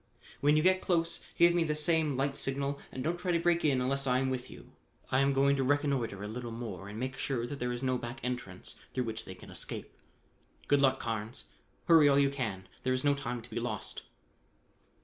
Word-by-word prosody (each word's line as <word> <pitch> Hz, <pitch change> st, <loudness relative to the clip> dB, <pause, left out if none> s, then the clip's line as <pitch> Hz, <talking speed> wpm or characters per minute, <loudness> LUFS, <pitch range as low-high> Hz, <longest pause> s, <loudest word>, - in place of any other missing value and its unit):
When 145 Hz, +1 st, +4 dB
you 155 Hz, -, +3 dB
get 185 Hz, +1 st, +4 dB
close 170 Hz, -2 st, 0 dB, 0.2 s
give 170 Hz, 0 st, +6 dB
me 175 Hz, -1 st, +3 dB
the 155 Hz, -2 st, 0 dB
same 155 Hz, -2 st, +2 dB
light 135 Hz, +1 st, 0 dB
signal 140 Hz, +1 st, -2 dB
and 130 Hz, -, -5 dB
don't 170 Hz, +4 st, -1 dB
try 180 Hz, 0 st, -1 dB
to 170 Hz, -, +3 dB
break 170 Hz, 0 st, +2 dB
in 140 Hz, -4 st, +3 dB
unless 135 Hz, +2 st, 0 dB
I 125 Hz, 0 st, +3 dB
am 130 Hz, 0 st, +1 dB
with 125 Hz, -1 st, -3 dB
you. -, -, -13 dB, 0.4 s
I 130 Hz, -, +4 dB
am 135 Hz, 0 st, +4 dB
going 140 Hz, +1 st, +4 dB
to 135 Hz, -, +1 dB
reconnoitre 135 Hz, -7 st, 0 dB
a -, -, -4 dB
little 120 Hz, +2 st, -5 dB
more 105 Hz, -5 st, -6 dB
and 105 Hz, +2 st, -6 dB
make 130 Hz, +1 st, -3 dB
sure 125 Hz, -4 st, -1 dB
that 140 Hz, +3 st, -6 dB
there 125 Hz, 0 st, -1 dB
is 120 Hz, +1 st, -4 dB
no 130 Hz, -1 st, +1 dB
back 120 Hz, +2 st, -6 dB
entrance 125 Hz, -7 st, -5 dB, 0.2 s
through 125 Hz, -, +1 dB
which 110 Hz, -1 st, -5 dB
they 95 Hz, -, -8 dB
can -, -, -13 dB
escape. -, -, -6 dB, 0.7 s
Good 145 Hz, -1 st, +4 dB
luck. 135 Hz, -1 st, +4 dB
Carnes: 115 Hz, +1 st, -4 dB, 0.4 s
hurry 160 Hz, -4 st, +7 dB
all 140 Hz, -, +4 dB
you 140 Hz, -1 st, +4 dB
can. 110 Hz, -9 st, -3 dB
There 130 Hz, -, +1 dB
is 130 Hz, -, -1 dB
no 145 Hz, -1 st, +4 dB
time 125 Hz, -4 st, -4 dB
to 120 Hz, -, -14 dB
be 115 Hz, -, -2 dB
lost." 115 Hz, -4 st, -4 dB
135 Hz, 225 wpm, -31 LUFS, 120-145 Hz, 0.7 s, hurry